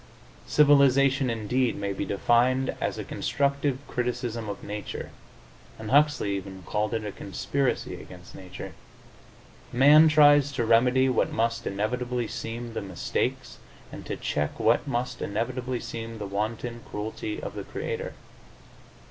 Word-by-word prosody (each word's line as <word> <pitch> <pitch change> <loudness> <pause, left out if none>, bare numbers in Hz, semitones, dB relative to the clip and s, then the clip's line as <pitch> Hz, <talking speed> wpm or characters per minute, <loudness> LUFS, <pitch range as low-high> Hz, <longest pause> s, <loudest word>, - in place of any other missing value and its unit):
Civilization, 140 -2 +5
indeed, 115 +2 0
may 100 -1 -3
be - - -3
defined 125 +5 +2
as - - -1
a - - -4
constructive 140 -1 0
criticism 120 -2 -3
of 100 - -6
nature, 105 0 -6 0.7
and 110 -1 -6
Huxley 145 -8 +3
even 95 -1 -8
called 105 +3 -1
it 110 -1 -3
a 105 - -3
conspiracy 125 +9 -2
against 90 -1 -13
nature. 90 -1 -9 1.0
Man 145 +5 +7
tries 145 -2 +6
to 120 -4 0
remedy 125 +3 +4
what 130 - +1
must 115 +1 -1
inevitably 120 +4 -2
seem 115 +2 -6
the - - -3
mistakes 95 -4 -3 0.3
and - - -8
to - - -3
check 75 0 -2
what - - +3
must 125 -1 -2
inevitably 125 +4 -2
seem 115 -1 -6
the 105 - -5
wanton 110 +4 -3
cruelty 110 - -4
of - - -6
the - - -5
Creator. 475 +1 -5
120 Hz, 135 wpm, -27 LUFS, 105-135 Hz, 1.0 s, Man